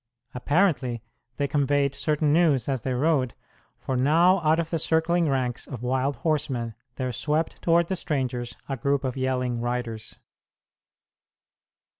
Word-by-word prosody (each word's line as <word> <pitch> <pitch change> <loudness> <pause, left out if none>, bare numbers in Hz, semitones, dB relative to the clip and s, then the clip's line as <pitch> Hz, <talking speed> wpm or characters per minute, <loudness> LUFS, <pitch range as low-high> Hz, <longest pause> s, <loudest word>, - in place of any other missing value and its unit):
Apparently 135 - +1 0.3
they 145 - 0
conveyed 140 0 +1
certain 150 0 +1
news 155 -7 +3
as 135 -4 -1
they 130 +2 -2
rode; 135 -2 +1 0.4
for 130 - -3
now 165 +9 +4
out 155 0 +3
of 165 -1 -2
the 165 - 0
circling 160 +1 +2
ranks 130 -2 -1
of 125 -3 -7
wild 130 +3 0
horsemen 135 -7 -1 0.2
there 130 -2 -3
swept 155 +7 -1
toward 170 0 +3
the 190 - -1
strangers 125 -7 -3
a 135 - -2
group 140 +2 0
of 130 -2 -2
yelling 125 -2 -1
riders. 120 -2 -4
140 Hz, 140 wpm, -25 LUFS, 125-155 Hz, 0.4 s, now